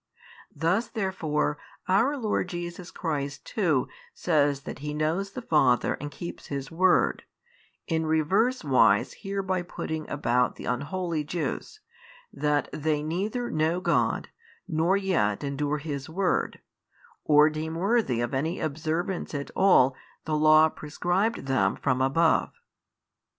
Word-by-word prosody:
Thus 180 +8 +1
therefore 160 -8 -1 0.3
our 230 +10 +3
Lord 215 -6 -1
Jesus 175 0 -6
Christ 145 -4 -4
too 160 - +1 0.3
says 145 -4 +1
that - - -8
He 150 +1 -4
knows 170 +6 -1
the 255 - -6
Father 135 - +3
and 145 - -4
keeps 160 +5 -8
His 140 0 -5
word, 180 +2 +3 0.6
in 160 -1 -1
reverse 190 +11 +2
wise 135 -4 +4
hereby 195 -2 -2
putting 160 -3 -5
about 125 -3 +1
the - - -9
unholy 155 +5 -2
Jews, 175 - -4 0.5
that 150 -1 0
they 150 -1 -1
neither 205 +10 -2
know 160 +3 +1
God - - 0 0.4
nor 170 +3 +2
yet 165 - 0
endure 145 +1 -1
His 145 -2 -5
word, 185 +4 -1 0.6
or 150 0 +5
deem 160 +1 -4
worthy 190 - +1
of 120 +1 -2
any 160 +7 -1
observance 160 +3 -2
at 140 0 -4
all 135 -9 +5 0.3
the 155 - -1
Law 155 +1 +6
prescribed 175 +9 -1
them 135 0 +1
from 130 -2 0
above. 160 +5 +2
160 Hz, 130 wpm, -27 LUFS, 145-185 Hz, 0.6 s, Law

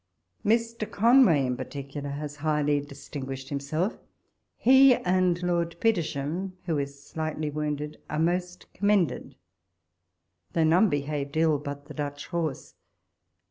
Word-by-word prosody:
Mr. 230 0 0
Conway, 225 - +5
in 125 -1 -1
particular, 140 +2 -6
has 145 +1 -5
highly 150 -1 +1
distin 140 0 -8
guished 135 0 -6
himself; 150 +8 -2 0.6
he 265 +1 +7
and 180 -2 +1
Lord 170 -1 0
Petersham, 175 -3 -1
who 160 -4 0
is 140 0 -5
slightly 155 -1 -3
wounded, 150 0 -3
are 150 - -2
most 175 +2 -1
commended; 200 -4 +1 1.2
though 165 - +2
none 175 +7 +5
behaved 145 0 -2
ill 160 -2 +3
but 145 0 -7
the 150 - -10
Dutch 145 -1 -4
horse. 165 -5 -3
155 Hz, 125 wpm, -27 LUFS, 145-180 Hz, 1.2 s, he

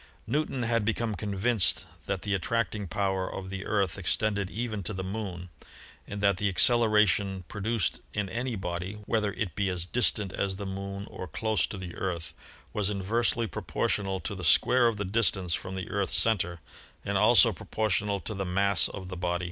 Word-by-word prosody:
Newton 140 -4 -1
had 115 -1 +1
become 115 +1 0
convinced 105 0 +1 0.2
that 95 -2 -2
the 105 - -1
attracting 105 +1 -1
power 95 0 -1
of 95 0 -6
the 95 0 -5
Earth 100 -2 0
extended 100 +1 0
even 110 -1 -3
to 95 +2 -5
the 95 - -3
Moon, 95 -3 -5 0.6
and 100 0 -5
that 100 -2 +3
the 105 - 0
ac 95 - -3
celeration 105 -5 +4
produced 105 -1 -1
in 105 -1 -2
any 120 +5 -3
body 90 0 -4
— - - -17
whether 105 -2 0
it 100 -5 -3
be 100 -1 0
as 90 -2 -1
distant 105 -2 +1
as 95 -1 -1
the 100 +1 -6
Moon 100 +1 -5
or 95 - -8
close 110 +6 0
to 100 - -6
the 90 -2 -7
Earth 85 -5 -3 0.2
— - - -25
was 105 -2 +1
inversely 115 +4 0
propor 85 - -3
tional 95 -3 0
to 100 - -3
the 95 -2 -7
square 120 +8 +5
of 115 -2 0
the 100 - -2
distance 95 -3 +1
from 95 +2 -4
the 95 -3 -4
Earth's 100 -1 +2
center 90 -7 +2 0.4
and 100 0 -1
also 105 0 +6
proportional 105 -2 -1
to 110 - -4
the 100 -1 -3
mass 95 -2 +3
of 95 -2 -7
the 90 - -6
body. 90 0 -1
100 Hz, 195 wpm, -28 LUFS, 95-110 Hz, 0.6 s, also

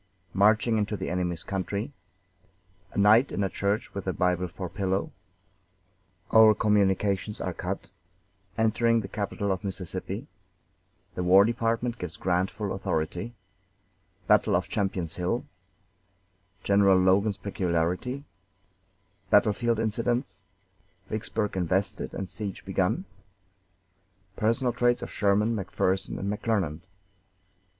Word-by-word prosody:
Marching 110 +3 +3
into 105 0 -1
the - - -4
enemy's 90 -2 -2
country 100 +6 -3 1.0
A - - -9
night 105 +6 +5
in 100 - -1
a 95 - 0
church 100 +4 -1
with 100 -1 -6
a 95 - +1
Bible 90 0 +1
for 90 +1 -6
pillow 95 +1 -2 1.2
Our 110 -1 +7
communications 100 0 +1
are - - -3
cut - - -5 0.7
Entering 115 +1 +3
the 95 - -6
capital 100 0 -2
of 95 +2 -2
Mississippi 95 -3 -4 0.9
The - - -3
War 95 +3 +7
Department 115 +1 -1
gives 90 -2 -6
Grant 90 +1 +1
full 105 -3 -4
authority 95 +4 -3 0.9
Battle - - +4
of - - 0
Champion's 95 -5 -2
Hill 90 +7 -1 1.2
General 100 -1 +5
Logan's 95 +2 +3
peculiarity 90 +7 -1 1.1
Battlefield 115 +2 +3
incidents 115 -1 -1 0.7
Vicksburg 110 -1 -2
invested 95 +2 -1
and 95 - -3
the 90 - -15
siege 100 -3 -6
begun - - 0 1.3
Personal 115 +4 +1
traits 120 0 +2
of - - -6
Sherman, 105 +3 +2
McPherson, 95 -1 -1
and 95 - -4
McClernand. 100 -8 -1
100 Hz, 115 wpm, -27 LUFS, 95-110 Hz, 1.3 s, Our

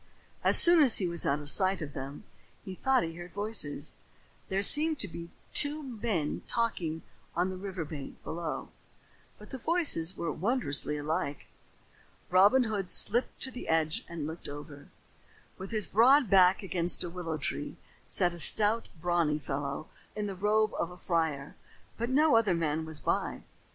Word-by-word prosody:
As - - +5
soon 345 -1 +6
as 265 -6 +5
he 185 - 0
was 170 -1 0
out 140 +1 +1
of 145 - -8
sight 190 -1 +3
of 150 -4 -7
them, 135 +6 -7 0.4
he 190 - -6
thought 265 +3 +2
he 165 0 -4
heard 175 +1 -9
voices. 200 -8 -2 0.5
There 195 +1 0
seemed 310 +7 +3
to 205 - -3
be 170 -1 -9 0.2
two 295 +1 +4
men 220 - -3
talking 175 -9 -1 0.3
on 180 +3 0
the - - -6
river 185 -3 -5
bank 145 -3 -8
below, 165 -1 -5 0.7
but - - -14
the 265 - -6
voices 265 - +1
were 170 - -2
wondrously 165 - 0
alike. 150 -1 -3 0.9
Robin 200 +8 +5
Hood 205 -5 -3
slipped 240 +7 +4
to 265 - -2
the 250 - -8
edge 160 -1 0
and 165 -3 -5
looked 160 +2 -7
over. 145 0 -10 0.7
With 190 +1 -7
his 215 -2 -1
broad 250 +3 +4
back 190 0 +5
against 180 -2 0
a 175 - -4
willow 165 -3 -4
tree, 145 - -5 0.3
sat 175 -1 0
a 175 - -7
stout, 215 +6 +2
brawny 170 -3 +1
fellow 140 0 -4 0.3
in 210 -1 -3
the 200 - -4
robe 210 +3 +1
of 170 - -1
a 180 - -12
friar, 160 -6 -2 0.4
but 235 +1 -2
no 295 +1 +4
other 215 -6 +3
man 160 -1 -1
was 160 -1 -6
by. - - -2
180 Hz, 170 wpm, -30 LUFS, 160-220 Hz, 0.9 s, soon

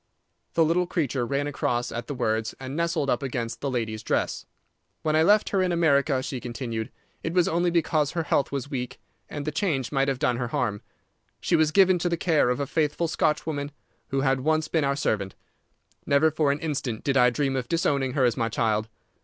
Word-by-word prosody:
The 165 - +4
little 175 +3 +1
creature 135 -8 -1
ran 140 +2 -1
across 125 -4 -1
at 120 - -5
the 145 - -4
words 110 -3 -1
and 135 +1 -6
nestled 170 -3 0
up 125 - +1
against 120 -4 -4
the 140 - -1
lady's 110 -4 -2
dress. - - -1 0.6
"When 155 -1 +1
I 155 - +4
left 205 +6 +4
her 195 - +1
in 185 -1 +1
America," 140 -5 +2
she 130 -1 -4
continued, 120 -2 -5 0.3
"it 165 - -3
was 180 -2 +4
only 175 +2 +1
because 155 -3 +1
her 170 -2 -1
health 145 - +1
was 140 -1 -3
weak, 125 -3 -4 0.3
and 145 -1 -5
the 155 - -1
change 150 - -1
might 135 -1 +1
have 135 -2 0
done 125 -3 +1
her 125 0 -2
harm. 120 -6 -1 0.6
She - - +1
was 155 -1 +3
given 185 +1 +4
to 175 - 0
the 170 - 0
care 160 -7 +2
of 125 - 0
a 140 - 0
faithful 155 +3 0
Scotch 155 -1 0
woman 145 -3 -3 0.4
who 135 0 -1
had 135 -1 +2
once 155 +2 +1
been 160 -3 +1
our 140 0 +1
servant. 100 -8 -1 0.7
Never 140 +3 +4
for 150 -2 +2
an 140 - -2
instant 140 -8 -3
did 140 - 0
I 125 -2 +6
dream 135 +2 -1
of 125 -2 -3
disowning 140 -6 +1
her 135 -3 +2
as 120 - +2
my 115 0 -1
child. 110 -1 0
140 Hz, 215 wpm, -26 LUFS, 125-160 Hz, 0.7 s, I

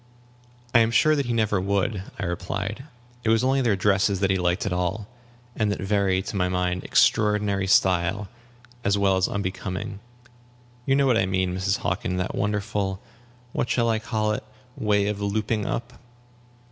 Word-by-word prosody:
"I 120 - +7
am 115 0 +4
sure 155 +6 +4
that 140 -4 -1
he - - -1
never 110 -4 +1
would," 100 +1 0 0.2
I - - -4
replied; 100 +7 -4 0.4
"it 110 - 0
was 115 +1 +3
only 135 +1 +2
their 115 -5 +2
dresses 95 0 +2
that 95 0 +2
he 95 - +2
liked 90 +1 0
at 100 - -1
all, 90 +4 -2 0.5
and 105 -2 +1
that - - -3
very, 95 -1 +1
to 100 - -6
my 90 -2 +1
mind, 90 0 -1
extraordinary 105 -2 +2
style, 95 +2 +2 0.6
as 100 +1 +2
well 100 -1 +3
as 95 0 +2
unbecoming. 95 0 -4 0.9
You 135 - +4
know 140 0 +3
what 125 -4 +3
I 95 - +1
mean, 95 -1 0
Mrs. 95 +2 0
Hockin, 90 +1 -2
that 90 - -2
wonderful 100 -1 -1 0.5
what 120 - -1
shall 115 -2 +2
I 110 -1 +1
call 110 -1 -1
it? 105 - -3 0.3
way 105 -2 +1
of 105 0 -2
looping 105 +1 -1
up." 120 +1 -3
100 Hz, 175 wpm, -25 LUFS, 95-110 Hz, 0.9 s, I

